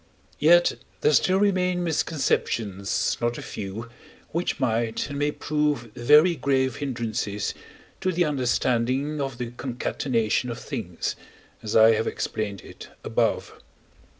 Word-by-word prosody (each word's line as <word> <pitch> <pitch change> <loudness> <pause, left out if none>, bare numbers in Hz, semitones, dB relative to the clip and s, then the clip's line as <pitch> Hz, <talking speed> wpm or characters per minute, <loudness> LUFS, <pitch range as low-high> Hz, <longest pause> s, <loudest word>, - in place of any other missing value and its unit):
Yet - - +5 0.2
there 450 0 +4
still 185 0 +4
remain 185 -3 +2
misconceptions 115 - 0
not 120 0 0
a - - -6
few, 105 +3 -6 0.4
which 170 +2 -1
might 115 +1 0
and 140 - -4
may 145 0 +2
prove 150 -7 -1
very 150 +8 +5
grave 130 -5 +1
hindrances 115 -6 -2 0.5
to 185 - 0
the 175 0 +2
understanding 130 +1 0
of 135 -3 -3
the 120 -1 -4
concatenation 120 -2 -1
of 120 - -4
things, 110 - -4 0.5
as 110 - -4
I 110 0 +8
have 110 - 0
explained 100 -3 -3
it - - -12
above. - - 0
125 Hz, 125 wpm, -25 LUFS, 115-150 Hz, 0.5 s, I